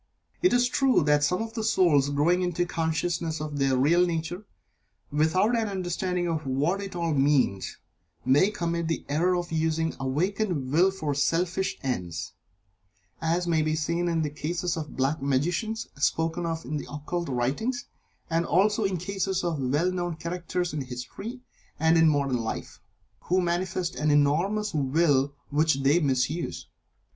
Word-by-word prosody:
It 365 - +4
is 245 0 +4
true 260 - +3
that 150 0 +3
some 180 +9 +1
souls 180 - +3
growing 155 +6 +2
into 175 -1 0
a - - -3
consciousness 165 -1 -1
of 150 -1 -4
their 135 -1 +2
real 165 +7 +4
nature, 175 +3 -3 0.6
without 165 +10 +2
an 225 -2 0
understanding 180 -2 -2
of 160 -4 -2
what 150 +9 0
it 195 -2 -7
all 170 -2 0
means, 135 -9 +1 0.5
may 140 +10 +4
commit 170 -5 -2
the 165 - -2
error 175 +5 +2
of 175 -1 -3
using 160 0 0
the - - -15
awakened 155 +1 -1
Will 175 +6 +5
for 160 -7 -3
selfish 175 +6 0
ends, 90 -11 -3 0.9
as 170 +2 +1
may 165 -2 +2
be 155 0 0
seen 170 +3 -1
in 165 -2 +1
the 150 - -2
cases 170 +4 -2
of 160 -2 -3
the - - -12
Black 135 +4 0
Magicians 175 - -1
spoken 165 +3 0
of 165 0 -3
in 150 +4 -3
the - - -7
occult 150 +3 -4
writings, 145 - -1 0.4
and 165 0 +1
also 205 +5 +2
in 195 -1 0
the 175 +1 -6
cases 195 -1 -1
of 170 -4 -1
well 145 +8 +1
known 175 -2 -2
characters 175 +1 -3
in 150 - -2
history 130 - -7 0.4
and 160 +1 +4
in 165 -1 +6
modern 140 -4 +1
life, 115 -1 -5 0.5
who 185 +1 +2
manifest 175 0 -1
an 150 - +1
enormous 170 +9 +2
Will 140 -1 +2 0.2
which 155 +1 +3
they 145 +5 +4
misuse. 140 +2 -1
165 Hz, 165 wpm, -27 LUFS, 145-180 Hz, 0.9 s, in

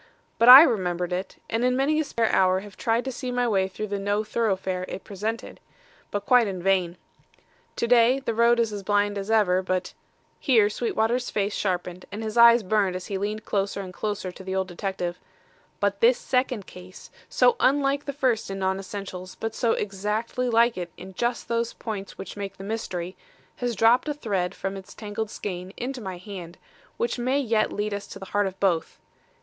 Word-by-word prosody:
But 230 - +6
I 265 +4 +13
remembered 180 - 0
it, 185 +2 -4
and 225 +1 -1
in 250 0 +2
many 295 +3 +2
a - - +2
spare 230 -6 0
hour 185 0 +3
have 200 -1 -12
tried 230 +2 0
to 265 - -2
see 255 0 -5
my 245 0 +1
way 195 -4 +2
through 200 +3 -5
the 200 -1 -3
no 205 +2 0
thoroughfare 190 -4 -1
it 195 - -7
presented. 215 +3 -5 0.5
But 205 0 -3
quite 245 -3 +5
in 190 -2 -4
vain. 185 -2 +1 0.8
To - - -1
day, 245 +2 +5
the 250 -4 -3
road 235 +1 +4
is 225 -2 +1
as 205 - -4
blind 205 +1 +1
as 195 +2 -6
ever, 200 -5 +3
but 185 0 -2 0.2
" - - -40
here 225 -7 +4
Sweetwater's 235 +2 0
face 205 0 -1
sharpened 180 -2 -2
and 210 +3 -5
his 215 0 -4
eyes 235 -1 +7
burned 195 -2 +1
as 185 - -5
he 195 -2 -3
leaned 210 +2 -3
closer 200 0 -1
and 185 -1 -8
closer 205 -2 -3
to 190 - -12
the 190 0 -4
older 190 -1 -2
detective 180 -1 -3 0.6
"but 200 0 0
this 240 +2 +5
second 250 -5 -1
case, 180 0 -13 0.2
so 485 - +4
unlike 280 +1 +2
the 280 - -2
first 255 -6 0
in 195 - -4
non 190 0 0
essentials 190 -2 -7
but 225 0 -4
so 230 0 +1
exactly 210 +5 -2
like 230 -2 +3
it 175 -1 -5
in 190 +1 -10
just 240 +5 -2
those 235 0 -1
points 205 -4 -6
which 190 - -8
make 200 -1 -6
the 195 - -9
mystery, 185 -4 -4 0.4
has 245 -2 -2
dropped 230 +7 +4
a 295 - -2
thread 195 -9 -2
from 195 0 -4
its 195 0 -10
tangled 210 0 -4
skein 185 -3 -6
into 255 +1 -4
my 190 -3 -5
hand, 180 -3 -9 0.4
which 470 - -1
may 260 +3 +1
yet 225 -5 +1
lead 210 0 -2
us 200 0 -5
to - - -9
the 195 - -9
heart 205 -1 +2
of 190 0 -8
both. 175 -5 0
205 Hz, 205 wpm, -25 LUFS, 190-235 Hz, 0.8 s, I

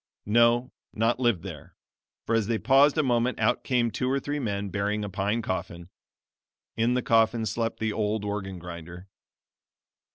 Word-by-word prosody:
No 120 +3 +3 0.2
not 115 +3 +1
lived 120 -9 +1
there, - - -9 0.5
for - - -1
as 115 -3 +2
they 115 -1 +1
paused 135 +6 +4
a 155 - +3
moment 125 -1 +1
out - - +1
came 120 -3 +1
two 125 +5 -2
or 135 +1 +1
three 145 +1 -3
men 100 -5 -2
bearing 100 +3 -1
a 100 - -6
pine 105 +4 -1
coffin. 85 -2 -4 0.9
In 115 +2 +1
the 125 - 0
coffin 115 0 +3
slept 115 +1 -2
the 110 -1 -1
old 105 -1 -1
organ 95 -2 -4
grinder. 85 +1 -9
110 Hz, 165 wpm, -27 LUFS, 100-120 Hz, 0.9 s, paused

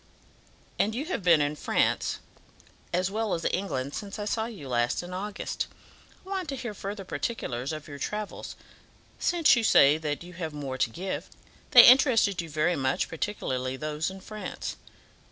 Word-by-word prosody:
And 215 +2 +2
you 275 +5 -2
have 345 - -2
been 170 -4 +5
in 145 +1 0
France - - +1 0.7
as 185 +2 0
well 220 0 0
as 165 - -5
England 140 -8 -2
since 205 0 -5
I 210 - -4
saw 220 +1 -1
you 200 - -9
last 120 +4 0
in 180 +1 -8
August. 200 +2 -3 0.6
I - - -12
want 380 -4 -3
to 275 - -2
hear 240 -4 -5
further 200 0 -6
particulars 135 - -3
of 155 -1 -6
your 145 -1 -8
travels, 210 +4 -4 0.6
since 340 -5 +4
you 235 - 0
say 150 -7 +6
that 150 0 -3
you 180 +1 -11
have 165 -3 -5
more 135 -3 -5
to - - +2
give. 185 +10 -5 0.4
They - - +10
interested 240 -7 +6
you 165 - -8
very 155 +4 +1
much, 130 -1 0
particularly 130 -8 -3
those 155 +2 -2
in 190 0 -10
France." 215 +2 -6
180 Hz, 170 wpm, -28 LUFS, 150-215 Hz, 0.7 s, They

